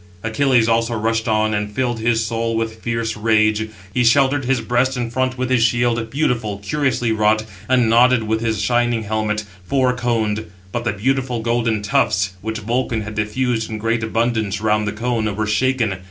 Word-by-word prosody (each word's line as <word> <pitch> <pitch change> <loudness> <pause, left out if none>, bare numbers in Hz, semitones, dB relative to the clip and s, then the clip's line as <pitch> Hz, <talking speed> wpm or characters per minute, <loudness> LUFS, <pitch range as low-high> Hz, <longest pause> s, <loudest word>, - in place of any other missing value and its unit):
Achilles 120 +1 +2
also 115 0 +1
rushed 115 +1 -1
on, 110 -1 +1
and 105 -1 -2
filled 120 0 -1
his 115 0 +1
soul 115 +1 -2
with 110 0 -3
fierce 115 -1 -2
rage. 110 0 +2 0.2
He 125 - +2
sheltered 135 +3 +3
his 130 -1 +1
breast 125 +3 0
in 120 -2 -3
front 130 +1 -1
with 130 0 -2
his 130 -3 +3
shield, 120 -1 +1
beautiful, 115 -7 -1
curiously 125 +2 -1
wrought 110 0 +2 0.2
and 125 -3 +3
nodded 120 +1 +4
with 110 +1 -1
his 110 -2 -1
shining 120 -2 +1
helmet, 110 0 -1 0.2
four 130 +5 +1
coned; 110 -4 -1 0.2
but 120 +4 -3
the 110 - 0
beautiful 125 +2 -1
golden 115 -2 0
tufts, 95 -2 +1
which 110 +1 -3
Vulcan 115 +1 -1
had 105 0 -6
diffused 110 +2 -1
in 110 - -4
great 115 +1 -1
abundance 110 -2 0
round 105 0 +1
the - - 0
cone, 110 -2 -2
were 110 +1 -1
shaken. 110 -1 +1
115 Hz, 180 wpm, -20 LUFS, 110-120 Hz, 0.2 s, nodded